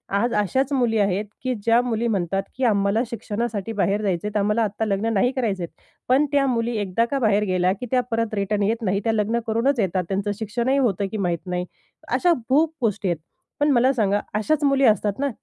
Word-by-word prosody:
आज 235 Hz, +4 st, +1 dB
अशाच 260 Hz, +7 st, 0 dB
मुली 240 Hz, -4 st, +1 dB
आहेत, 200 Hz, +1 st, +1 dB, 0.2 s
की 255 Hz, -1 st, 0 dB
ज्या 230 Hz, +2 st, +4 dB
मुली 235 Hz, -1 st, -1 dB
म्हणतात 195 Hz, -2 st, -1 dB
की 260 Hz, -, -2 dB
आम्हाला 205 Hz, -1 st, +2 dB
शिक्षणासाठी 225 Hz, -1 st, -3 dB
बाहेर 200 Hz, 0 st, 0 dB
जायचे 195 Hz, -2 st, -1 dB
आहेत, 210 Hz, 0 st, -2 dB
आम्हाला 210 Hz, +3 st, +1 dB
आत्ता 215 Hz, +1 st, -2 dB
लग्न 215 Hz, +2 st, 0 dB
नाही 220 Hz, +5 st, +2 dB
करायचे 210 Hz, -8 st, -1 dB
आहेत. 170 Hz, -, -10 dB, 0.3 s
पण 270 Hz, +4 st, +4 dB
त्या 285 Hz, -1 st, +3 dB
मुली 235 Hz, -1 st, 0 dB
एकदा 205 Hz, +3 st, 0 dB
का 275 Hz, -, 0 dB
बाहेर 210 Hz, -4 st, +2 dB
गेल्या, 185 Hz, -2 st, +1 dB
की 230 Hz, +5 st, -7 dB
त्या 255 Hz, -1 st, +3 dB
परत 225 Hz, -1 st, -1 dB
रिटर्न 205 Hz, 0 st, 0 dB
येत 225 Hz, +4 st, 0 dB
नाही, 195 Hz, 0 st, +1 dB
त्या 225 Hz, -, +1 dB
लग्न 220 Hz, +2 st, 0 dB
करूनच 235 Hz, +4 st, +1 dB
येतात. 185 Hz, -2 st, 0 dB
त्यांचं 200 Hz, +1 st, -1 dB
शिक्षणही 235 Hz, +5 st, 0 dB
होतं 205 Hz, -7 st, +1 dB
की 220 Hz, -, -3 dB
माहीत 175 Hz, -4 st, -2 dB
नाही. 180 Hz, 0 st, -2 dB, 0.4 s
अशा 350 Hz, -1 st, +3 dB, 0.2 s
खूप 310 Hz, +4 st, +3 dB
गोष्टी 215 Hz, -3 st, 0 dB
आहेत. 170 Hz, -, -1 dB, 0.4 s
पण 290 Hz, -, +3 dB
मला 255 Hz, +1 st, +4 dB
सांगा, 205 Hz, -5 st, +1 dB
अशाच 295 Hz, +9 st, 0 dB
मुली 275 Hz, -1 st, +3 dB
असतात 210 Hz, 0 st, +2 dB
ना, 280 Hz, 0 st, +1 dB
220 Hz, 210 wpm, -23 LUFS, 200-245 Hz, 0.4 s, ज्या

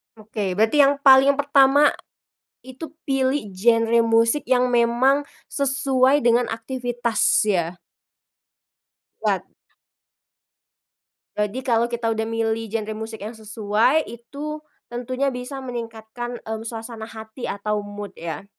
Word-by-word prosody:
Oke, 210 Hz, -3 st, -4 dB
berarti 220 Hz, +8 st, +2 dB
yang 280 Hz, 0 st, +6 dB
paling 270 Hz, +1 st, +7 dB
pertama, 285 Hz, 0 st, +4 dB, 0.7 s
itu 265 Hz, +4 st, -9 dB
pilih 265 Hz, -5 st, 0 dB
genre 230 Hz, +4 st, +3 dB
musik 230 Hz, +5 st, +2 dB
yang 250 Hz, -1 st, +3 dB
memang 245 Hz, +4 st, +3 dB, 0.3 s
sesuai 275 Hz, 0 st, +2 dB
dengan 240 Hz, 0 st, +3 dB
aktivitas 240 Hz, 0 st, -3 dB, 0.2 s
ya. 175 Hz, -4 st, -1 dB, 1.4 s
Wat -, -, 0 dB, 1.9 s
Jadi 210 Hz, +4 st, -1 dB
kalo 235 Hz, -1 st, +1 dB
kita 235 Hz, -1 st, -2 dB
udah 220 Hz, -, -2 dB
milih 225 Hz, 0 st, -1 dB
genre 215 Hz, -1 st, -2 dB
musik 220 Hz, 0 st, -7 dB
yang 220 Hz, +3 st, -7 dB
sesuai, 220 Hz, +7 st, +1 dB
itu, 285 Hz, +6 st, -7 dB, 0.3 s
tentunya 255 Hz, +3 st, -2 dB
bisa 250 Hz, +2 st, -6 dB
meningkatkan, 240 Hz, -1 st, -6 dB
e 220 Hz, -, -9 dB
suasana 225 Hz, 0 st, -7 dB
hati 220 Hz, +3 st, -10 dB
atau 210 Hz, +1 st, -2 dB
mood 205 Hz, 0 st, -8 dB
ya. 165 Hz, +2 st, -6 dB
235 Hz, 115 wpm, -22 LUFS, 220-265 Hz, 1.9 s, paling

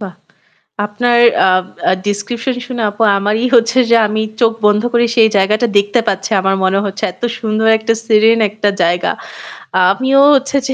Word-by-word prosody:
বাহ! 190 Hz, -4 st, -8 dB, 0.7 s
আপনার 240 Hz, +3 st, 0 dB, 0.3 s
আ -, -, +3 dB, 0.4 s
আ -, -, +3 dB
ডেসক্রিপশন 230 Hz, +5 st, -3 dB
শুনে 245 Hz, -2 st, -5 dB
আপু 210 Hz, +2 st, -5 dB, 0.2 s
আমারই 210 Hz, +4 st, -1 dB
হচ্ছে 230 Hz, +2 st, +1 dB
যে 235 Hz, -, +5 dB
আমি 215 Hz, +1 st, -3 dB, 0.2 s
চোখ 230 Hz, -1 st, +3 dB
বন্ধ 210 Hz, 0 st, +2 dB
করে 240 Hz, 0 st, +2 dB
সেই 225 Hz, -2 st, +5 dB
জায়গাটা 210 Hz, +4 st, +1 dB
দেখতে 205 Hz, +4 st, 0 dB
পাচ্ছি। 195 Hz, +2 st, -3 dB
আমার 195 Hz, +1 st, 0 dB
মনে 190 Hz, +1 st, +1 dB
হচ্ছে 200 Hz, 0 st, -5 dB
এত্ত -, -, -27 dB, 0.2 s
সুন্দর 220 Hz, -1 st, -2 dB
একটা 220 Hz, +1 st, -1 dB
সিরিন 225 Hz, +1 st, +3 dB
একটা 210 Hz, 0 st, -2 dB
জায়গা। 175 Hz, +1 st, 0 dB, 0.7 s
আ -, -, +3 dB
আমিও 265 Hz, +5 st, +1 dB
হচ্ছে 275 Hz, +1 st, -1 dB
যে 265 Hz, -, -2 dB
220 Hz, 175 wpm, -14 LUFS, 200-235 Hz, 0.7 s, যে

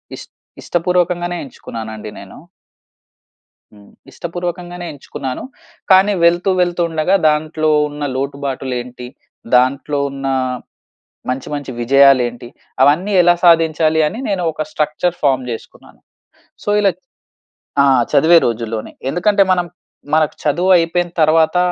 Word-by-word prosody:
ఇష్ట్ -, -, -12 dB, 0.3 s
ఇష్టపూర్వకంగానే 175 Hz, 0 st, -1 dB
ఎంచుకున్నాను 115 Hz, -4 st, -8 dB
అండి 105 Hz, 0 st, -8 dB
నేను. 100 Hz, -1 st, -12 dB, 1.4 s
హ్మ్, 100 Hz, -1 st, -18 dB, 0.2 s
ఇష్టపూర్వకంగానే 175 Hz, +1 st, -6 dB
ఎంచుకున్నాను. 135 Hz, -2 st, -6 dB, 0.5 s
కానీ 190 Hz, +2 st, +5 dB
వెళ్తూ 175 Hz, +3 st, +2 dB
వెళ్తూ 175 Hz, 0 st, 0 dB
ఉండగా 160 Hz, +4 st, +1 dB
దాంట్లో 155 Hz, +1 st, -1 dB, 0.2 s
ఉన్న 145 Hz, 0 st, -7 dB
లోటుబాటులు 135 Hz, -1 st, -4 dB
ఏంటి, 125 Hz, 0 st, -10 dB, 0.5 s
దాంట్లో 140 Hz, +3 st, +1 dB
ఉన్న 135 Hz, 0 st, -5 dB, 1.0 s
మంచి 130 Hz, +1 st, -3 dB
మంచి 145 Hz, -2 st, -5 dB
విజయాలు 135 Hz, +1 st, +5 dB
ఏంటి? 120 Hz, 0 st, -11 dB, 0.3 s
అవన్నీ 165 Hz, +9 st, +3 dB
ఎలా 175 Hz, 0 st, +5 dB
సాధించాలి 160 Hz, -1 st, +3 dB
అని 215 Hz, -, -4 dB
నేను 195 Hz, -3 st, -1 dB
ఒక 155 Hz, -, -4 dB
స్ట్రక్చర్ 155 Hz, +1 st, -1 dB
ఫార్మ్ 130 Hz, -2 st, +2 dB
చేసుకున్నాను. 115 Hz, -, -12 dB, 0.6 s
సో -, -, -1 dB
ఇలా 200 Hz, -, +3 dB, 0.9 s
ఆ! -, -, +5 dB, 0.3 s
చదివే 170 Hz, +2 st, +5 dB
రోజుల్లోనే 115 Hz, -1 st, -4 dB, 0.2 s
ఎందుకంటే 195 Hz, +7 st, +2 dB
మనం, 180 Hz, -1 st, +1 dB, 0.5 s
మనకు 155 Hz, -1 st, +2 dB
చదువు 175 Hz, +6 st, +1 dB
అయిపోయిన 175 Hz, +1 st, 0 dB
తర్వాత 160 Hz, +2 st, +3 dB
155 Hz, 115 wpm, -17 LUFS, 135-175 Hz, 1.4 s, కానీ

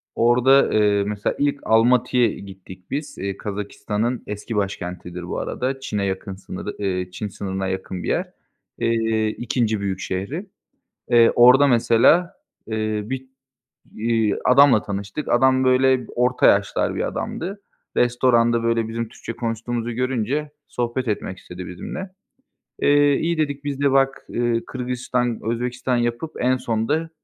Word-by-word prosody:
Orada, 125 Hz, +3 st, +4 dB
eee, 105 Hz, -1 st, +3 dB
mesela 105 Hz, -1 st, -2 dB
ilk 145 Hz, 0 st, +1 dB
Almatı'ya 120 Hz, +2 st, +3 dB
gittik 95 Hz, -3 st, -10 dB
biz, 145 Hz, +2 st, -4 dB
eee, 100 Hz, 0 st, -4 dB
Kazakistan'ın 105 Hz, +3 st, -3 dB
eski 105 Hz, +2 st, -5 dB
başkentidir 90 Hz, -3 st, -4 dB
bu 90 Hz, -, -4 dB
arada, 135 Hz, +2 st, -3 dB
Çin'e 105 Hz, -6 st, -2 dB
yakın 95 Hz, 0 st, -3 dB
sınırı, 95 Hz, +1 st, -7 dB
eee, 90 Hz, -2 st, -2 dB
Çin 105 Hz, +3 st, -5 dB
sınırına 95 Hz, -1 st, -4 dB
yakın 95 Hz, -1 st, -4 dB
bir -, -, -5 dB
yer, -, -, -1 dB, 0.5 s
eee, 115 Hz, -1 st, +1 dB
2. 110 Hz, -1 st, -1 dB
büyük 95 Hz, -2 st, -3 dB
şehri. 100 Hz, -, -4 dB, 0.7 s
Eee, 115 Hz, -1 st, +6 dB
orada 125 Hz, +4 st, +7 dB
mesela, 125 Hz, +8 st, +4 dB, 0.3 s
eee, 110 Hz, -1 st, -1 dB
bir, 130 Hz, +3 st, -5 dB, 0.7 s
iii, 110 Hz, -2 st, +1 dB
adamla 130 Hz, -3 st, +6 dB
tanıştık. 100 Hz, +7 st, -5 dB
Adam 130 Hz, +2 st, +4 dB
böyle 130 Hz, -1 st, +3 dB
orta 125 Hz, +1 st, +2 dB
yaşlar -, -, +2 dB
bir -, -, -1 dB
adamdı. 195 Hz, +4 st, -5 dB, 0.4 s
Restoranda 120 Hz, -1 st, +3 dB
böyle 115 Hz, -1 st, +1 dB
bizim 115 Hz, +1 st, -2 dB
Türkçe 115 Hz, -, -8 dB
konuştuğumuzu 115 Hz, +1 st, -3 dB
görünce 130 Hz, +4 st, -1 dB, 0.2 s
sohbet 120 Hz, +1 st, -2 dB
etmek 95 Hz, -3 st, -3 dB
istedi 90 Hz, 0 st, -9 dB
bizimle. 185 Hz, -, -6 dB, 0.7 s
Eee, 145 Hz, 0 st, +4 dB
iyi 170 Hz, 0 st, -1 dB
dedik, 145 Hz, -2 st, -1 dB
biz 140 Hz, -1 st, -4 dB
de 140 Hz, -1 st, +3 dB
bak, 135 Hz, 0 st, +2 dB
eee, 120 Hz, -1 st, 0 dB
Kırgızistan, 125 Hz, -1 st, -2 dB
Özbekistan 120 Hz, +2 st, -1 dB
yapıp 120 Hz, +6 st, -2 dB
en 130 Hz, +1 st, +2 dB
sonda 125 Hz, +7 st, -1 dB
120 Hz, 135 wpm, -22 LUFS, 105-130 Hz, 0.7 s, orada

